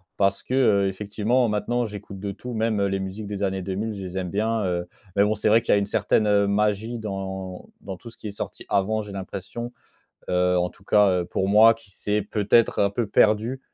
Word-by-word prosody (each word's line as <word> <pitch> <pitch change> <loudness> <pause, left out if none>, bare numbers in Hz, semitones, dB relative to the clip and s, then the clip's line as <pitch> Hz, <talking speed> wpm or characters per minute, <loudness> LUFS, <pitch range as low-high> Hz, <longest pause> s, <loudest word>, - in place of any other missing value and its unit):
parce 100 0 +1
que, 130 - -6
heu, 100 -7 +4
effectivement 105 +5 0
maintenant 120 +3 0
j'écoute 100 -2 -8
de 100 -1 -3
tout, 125 +5 -8
même, 110 -1 0
heu, 100 - +2
les 95 0 -1
musiques 100 +2 -6
des 100 -1 -4
années 95 -1 -1
deux 95 +1 -4
mille, 110 +2 -2
je 100 -1 -7
les 90 +1 -6
aime 90 -2 -2
bien, 110 +2 0
heu. 90 -1 -2 0.3
Mais 100 - +6
bon 110 +1 +1
c'est 105 - +1
vrai 115 +2 +5
qu'il - - +2
y - - +6
a - - +4
une 100 - +1
certaine, 105 +1 +1
heu, 100 -1 +3
magie 105 +3 0
dans 95 -3 -5
dans 95 -2 -7
tout 115 - -11
ce - - -15
qui 110 - -7
est - - -4
sorti 100 - -7
avant 110 +3 +1
j'ai 105 -1 -9
l'impression, 100 +5 -6 0.6
heu, 90 0 +2
en 90 0 +1
tout 95 - -22
cas, 105 -2 +4
heu, - - -6
pour 95 +2 -2
moi 110 +2 +7
qui 115 -3 -18
s'est 105 +2 -1
peut-être 105 +3 +2
un 100 -1 +3
peu 110 0 -2
perdue. 110 +5 +2
105 Hz, 240 wpm, -24 LUFS, 95-110 Hz, 0.6 s, moi